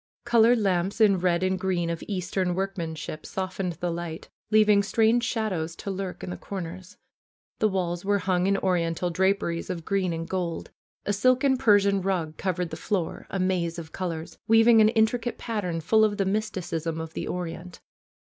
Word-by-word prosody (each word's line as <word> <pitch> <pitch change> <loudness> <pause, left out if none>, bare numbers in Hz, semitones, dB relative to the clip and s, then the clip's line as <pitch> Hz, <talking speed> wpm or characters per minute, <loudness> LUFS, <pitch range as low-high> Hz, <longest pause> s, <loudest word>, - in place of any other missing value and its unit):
Colored 235 0 +5
lamps 195 -1 0
in 200 -4 +5
red 175 0 +1
and 185 0 0
green 180 -2 0
of 165 - -5
eastern 185 -2 -1
work 195 +1 -2
manship 160 -3 -5
softened 185 -1 -3
the 175 +2 -3
light, 170 -1 -6 0.2
leaving 215 -1 +5
strange 225 +3 +2
shadows 185 -10 -2
to 200 - -5
lurk 190 -1 -5
in - - -5
the - - -5
corners. 185 -1 -7 0.6
The 215 - +4
walls 180 -3 -2
were 200 +1 +2
hung 185 -1 +1
in 200 0 +2
Oriental 175 -2 0
draperies 190 -1 0
of 170 -3 -4
green 195 -3 0
and 165 0 -4
gold. 175 -3 -3 0.3
A 205 - 0
silken 255 +6 +3
Persian 205 -6 +4
rug 175 -5 -1
covered 180 -2 -2
the 160 - -5
floor, 175 -1 -3
a - - -3
maze 180 -2 0
of 160 -2 -8
colors, 165 -3 -5
weaving 225 0 +6
an 215 - +6
intri 220 +1 +2
cate 240 - -4
pattern 185 -8 -3
full 220 +7 +4
of 210 -1 +2
the 195 - +1
mysticism 185 -6 -2
of 160 0 -6
the - - -4
Orient. 175 0 -5
185 Hz, 180 wpm, -26 LUFS, 170-205 Hz, 0.6 s, weaving